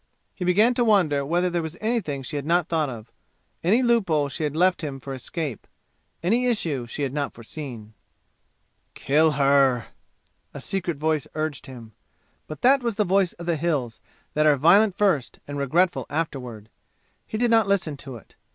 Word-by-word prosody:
He 185 - -6
began 205 +7 +4
to 240 - +1
wonder 175 -11 +3
whether 175 +5 +1
there 175 -1 -1
was 160 +1 -6
anything 215 - -2
she 150 - -6
had 145 - -2
not 170 +2 +1
thought 155 -3 0
of 115 -2 -9 0.5
any 215 +9 +3
loophole 180 - +2
she 155 - -5
had 150 -1 -2
left 180 +1 +2
him 140 -3 -4
for 135 +1 -7
escape 135 - -5 0.6
any 235 +8 +2
issue 155 - -1
she 145 +5 -4
had 135 -2 -2
not 145 -2 -3
foreseen. 115 -3 -9 1.0
"Kill 155 +2 +2
her!" 135 -3 +3 0.7
a - - -5
secret 180 -5 -3
voice 155 -1 0
urged 155 -3 -3
him. 120 -4 -11 0.6
But 155 -2 -9
that 270 +2 +5
was 235 -3 -2
the 210 0 +1
voice 190 -1 +2
of 170 - -10
the 170 -2 0
"Hills," 145 -8 -2 0.3
that 155 +1 +3
are 150 -2 +5
violent 190 +7 +4
first 180 -11 +1
and 145 0 -5
regretful 170 +7 +1
afterward. 125 -8 -4 0.6
He 215 - -4
did 240 +1 +1
not 225 -3 +4
listen 185 -7 0
to 135 -2 -9
it. 115 - -14
155 Hz, 180 wpm, -24 LUFS, 140-185 Hz, 1.0 s, that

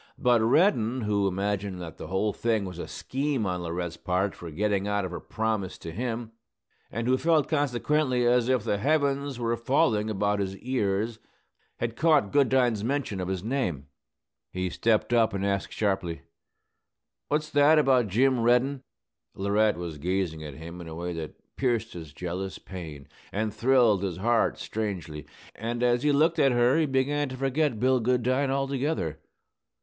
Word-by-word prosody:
But 120 -2 +3
Reddin, 125 - +3
who 105 -2 +1
imagined 100 0 -2
that 80 -2 -8
the - - -7
whole 100 +4 0
thing 110 -3 0
was 90 -2 -7
a - - -5
scheme 135 -3 -2
on 90 -1 -2
Laurette's 85 0 -4
part 95 +2 -1
for 85 - -9
getting 100 +4 0
out 105 -1 0
of 90 - -5
her 90 - -5
promise 110 -4 -2
to 80 - -8
him, 115 +3 -4 0.6
and 115 0 -3
who 130 +1 +2
felt, 160 -4 +3
consequently, 145 -2 +1
as 120 0 +3
if 130 -4 +2
the 105 -3 -1
heavens 140 -1 +1
were 115 -1 0
falling 115 -3 +1
about 105 0 0
his 95 -1 -3
ears, 110 -2 -1 0.6
had 115 -1 -3
caught 150 -9 +3
Goodine's 125 -6 +3
mention 120 -6 -2
of 90 - -3
his 95 -1 -3
name. 95 - -2 0.6
He 90 -1 -2
stepped 115 +5 +1
up 115 -4 +3
and 100 0 -1
asked 100 -1 -1
sharply, 95 -5 -1 1.0
"What's 155 +1 -1
that 145 +2 +5
about 130 -6 +4
Jim 125 +6 +2
Reddin?" 125 +4 +2 0.5
Laurette 100 0 +2
was 85 -4 -6
gazing 90 -1 -2
at 75 -3 -8
him 85 +4 -9
in 85 - -9
a 80 - -7
way 85 +1 -4
that 80 -2 -9
pierced 120 -4 0
his 80 -4 -8
jealous 90 +4 -5
pain 80 -7 -9 0.2
and 105 +1 -2
thrilled 115 -3 +3
his 95 -3 -3
heart 115 +4 +1
strangely; 90 -9 -4 0.3
and 120 +2 -3
as 120 0 +3
he 150 +1 +3
looked 160 +3 +3
at 135 -3 +4
her 120 +5 +3
he 160 - +2
began 140 +2 0
to 130 - -7
forget 135 -2 0
Bill 130 +1 +3
Goodine 125 +3 +1
altogether. 135 - -1
110 Hz, 170 wpm, -27 LUFS, 95-130 Hz, 1.0 s, that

